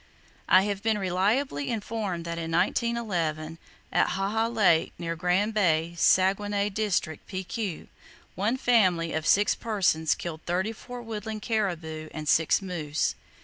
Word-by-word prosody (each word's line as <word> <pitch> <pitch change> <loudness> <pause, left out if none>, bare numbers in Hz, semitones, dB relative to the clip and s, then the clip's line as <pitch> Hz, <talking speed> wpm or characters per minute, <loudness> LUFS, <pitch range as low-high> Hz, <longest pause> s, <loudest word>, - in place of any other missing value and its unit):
I 185 - +7
have 200 -1 -2
been 220 0 +1
reliably 190 - 0
informed 205 -6 -3
that 170 0 -4
in 165 0 -4
1911, 175 -5 -1 0.3
at - - +3
Haha 210 +4 0
Lake, 200 -8 +3
near 165 -1 -3
Grande 180 +6 +1
Bay, 170 -5 +2
Saguenay 200 +3 +2
District, 190 -7 -1
P.Q., 190 -1 -4 0.5
one 215 +7 0
family 185 -10 +2
of 160 0 -2
six 205 +1 +4
persons 185 -8 +1
killed 160 -2 -6
thirty 185 +5 0
four 245 +2 -9
woodland 220 -1 -5
caribou 165 -8 -2
and 155 -1 -5
six 160 +6 +3
moose. 155 -5 -1
190 Hz, 135 wpm, -27 LUFS, 165-215 Hz, 0.5 s, I